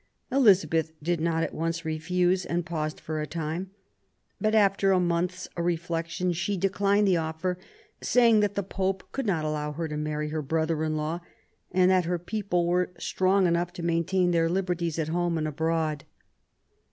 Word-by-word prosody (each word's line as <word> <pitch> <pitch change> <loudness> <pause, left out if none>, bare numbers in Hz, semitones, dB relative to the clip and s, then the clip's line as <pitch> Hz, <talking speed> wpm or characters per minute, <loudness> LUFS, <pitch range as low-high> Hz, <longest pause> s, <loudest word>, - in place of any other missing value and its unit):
Elizabeth 190 - +4
did 170 0 0
not 165 0 +1
at - - -3
once 165 +1 -2
refuse, 180 +4 +1
and 175 0 -2
paused 155 -3 -3
for 155 -1 -4
a 150 - -3
time; 165 +4 -4 0.7
but, 215 0 +1
after 195 -2 +4
a 185 - +4
month's 175 +1 -1
reflection, 170 +1 -1
she 175 +4 -1
declined 200 +2 +2
the 185 -2 +4
offer 165 +3 -2 0.4
saying 235 -3 +4
that 205 -1 +1
the 200 - 0
Pope 190 0 -2
would 270 -4 -2
not 165 -6 0
allow 150 -1 -2
her 165 +2 -3
to 150 -1 -4
marry 150 0 -2
her 155 0 -2
brother 160 +2 0
in 155 0 -1
law, 155 +3 -2 0.5
and 185 0 +4
that 185 -2 +3
her 175 +1 0
people 180 -1 -1
were 180 +1 +1
strong 190 +1 +2
enough 170 0 +1
to 175 - -7
maintain 175 +2 +1
their 165 -1 +2
liberties 175 -3 -1
at 160 -1 -1
home 175 0 0
and 155 -1 -1
abroad. 155 -1 -1
170 Hz, 175 wpm, -27 LUFS, 160-185 Hz, 0.7 s, Elizabeth